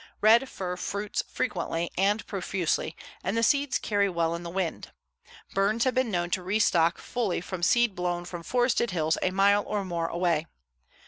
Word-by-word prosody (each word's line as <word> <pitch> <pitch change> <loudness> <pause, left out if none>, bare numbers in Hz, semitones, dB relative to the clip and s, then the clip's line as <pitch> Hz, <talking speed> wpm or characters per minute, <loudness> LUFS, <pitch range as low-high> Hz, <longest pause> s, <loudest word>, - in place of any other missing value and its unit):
Red 230 +5 +5
fir 180 -1 -4
fruits 200 +3 -2
frequently 170 -2 -2
and 205 +3 +1
profusely, 180 -4 -2 0.3
and 195 +5 -1
the 230 - +2
seeds 280 +4 +2
carry 200 -2 +1
well 170 -2 0
in 170 - -4
the 170 - -6
wind. 180 -1 -3 0.6
Burns 205 +4 +2
have 255 - +2
been 255 -1 +1
known 175 -3 -1
to 185 - 0
restock 180 -3 +2
fully 230 -7 -2
from 180 +1 -6
seed 240 +4 +3
blown 175 -1 -2
from 175 -1 -7
forested 245 +4 +1
hills 160 -2 0
a - - +2
mile 200 +2 +3
or 205 -2 -2
more 170 -2 -2
away. 170 -2 0
190 Hz, 175 wpm, -27 LUFS, 175-215 Hz, 0.6 s, Red